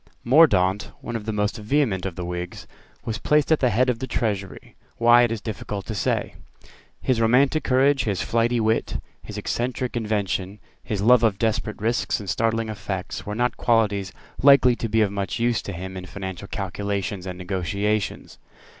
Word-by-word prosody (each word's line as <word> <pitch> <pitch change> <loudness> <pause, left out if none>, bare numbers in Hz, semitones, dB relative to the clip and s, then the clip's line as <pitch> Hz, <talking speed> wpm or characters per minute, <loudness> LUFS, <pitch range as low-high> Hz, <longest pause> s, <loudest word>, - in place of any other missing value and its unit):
Mordaunt, 105 - +4
one 120 - -5
of 110 -2 -4
the 110 - -2
most 105 0 -1
vehement 110 -4 0
of 90 - -6
the 90 - -5
Whigs, 90 0 -5 0.4
was 110 -1 -3
placed 150 0 +2
at 160 - +4
the 125 - +3
head 125 +3 +2
of 125 -2 0
the 130 - -4
Treasury; 100 -6 -3 0.2
why, 120 +1 +6
it 120 -2 +2
is 115 -2 -3
difficult 105 -2 -5
to 110 - -4
say. 100 - -1 0.7
His 125 -3 0
romantic 130 +7 +3
courage, 135 0 +3
his 100 -5 -1
flighty 115 +6 +1
wit, 110 0 0 0.2
his - - -9
eccentric 125 +1 -2
invention, 105 -3 -2 0.2
his 100 -2 -3
love 125 +1 +6
of 110 -4 +2
desperate 110 0 -1
risks 105 -4 0
and 100 - -8
startling 115 +3 0
effects, 100 -3 -5
were 105 - -3
not 120 +1 0
qualities 105 -5 +1 0.3
likely 135 -3 +6
to 115 - -3
be 110 +1 +2
of 105 -2 +2
much 100 +1 -3
use 120 0 +1
to - - -6
him 95 +1 -7
in 90 0 -7
financial 95 +2 -7
calculations 100 -1 -3
and 90 -1 -5
negotiations. 100 +3 -2
110 Hz, 180 wpm, -24 LUFS, 100-120 Hz, 0.7 s, why